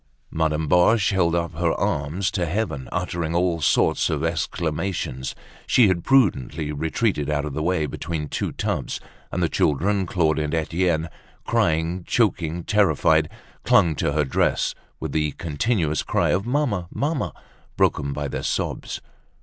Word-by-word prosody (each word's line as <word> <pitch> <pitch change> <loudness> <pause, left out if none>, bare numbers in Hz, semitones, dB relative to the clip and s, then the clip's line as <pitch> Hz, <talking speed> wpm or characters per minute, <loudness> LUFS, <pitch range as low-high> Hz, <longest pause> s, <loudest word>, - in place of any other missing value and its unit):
Madame 80 -1 0
Boche 90 +7 +4
held 85 -3 +2
up 85 -1 -1
her 80 0 +1
arms 80 +7 -1
to 90 -5 -1
heaven, 80 -7 -2
uttering 85 -2 -2
all 85 -2 +1
sorts - - +2
of 75 0 -1
exclamations. 80 -3 -2 0.3
She 115 -5 +5
had 85 -3 0
prudently 80 - +2
retreated 80 +1 -1
out 75 -1 0
of 75 - -5
the 75 - -2
way 85 -1 +1
between 75 +1 -4
two - - -2
tubs; - - -2 0.3
and - - -1
the - - +3
children, 95 +6 +1
Claude 80 -3 +1
and 75 +1 -1
Etienne, 85 0 0 0.4
crying, 80 +3 +1
choking, 85 -7 +1
terrified, 80 -6 +3 0.3
clung 85 -2 +4
to 70 - 0
her 75 -1 +2
dress 65 - +1 0.3
with - - -4
the 75 -1 0
continuous 80 - 0
cry - - +1
of 100 +4 0
"Mamma! 120 -10 0
Mamma!" 145 +4 -1 0.5
broken 70 0 +2
by 75 +1 -3
their - - -4
sobs. - - -3
85 Hz, 150 wpm, -23 LUFS, 75-95 Hz, 0.5 s, She